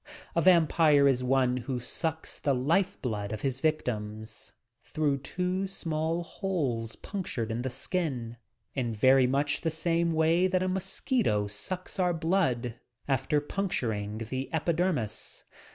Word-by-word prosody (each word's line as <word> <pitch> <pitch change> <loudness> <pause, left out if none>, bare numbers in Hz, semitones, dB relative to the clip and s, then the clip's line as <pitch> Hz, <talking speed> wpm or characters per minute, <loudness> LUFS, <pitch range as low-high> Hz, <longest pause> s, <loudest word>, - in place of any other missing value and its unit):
A 170 - +3
vampire 160 -4 +5
is 130 -2 +2
one 125 -1 +2
who 125 0 -3
sucks 160 +6 -3
the 140 -2 +1
life 165 +10 +1
blood 105 -5 -2
of 110 -1 -4
his 135 -1 -2
victim, 110 -9 -1 0.6
through 145 -3 0
two 180 +6 -2
small 165 -2 -2
holes 145 - -2
punctured 145 - -4
in 115 +2 -2
the 130 - -2
skin, 130 -4 -3 0.4
in 120 -4 -2
very 130 +3 +5
much 140 +3 +1
the 165 - +1
same 165 +1 +1
way 165 +3 +3
that 185 0 +1
a - - 0
mosquito 190 - 0
sucks 180 - -5
our 180 -2 +2
blood 160 - 0 0.3
after 140 +2 +2
puncturing 115 - -2
the 130 +4 -4
epidermis. 160 - -1
145 Hz, 135 wpm, -29 LUFS, 125-170 Hz, 0.6 s, vampire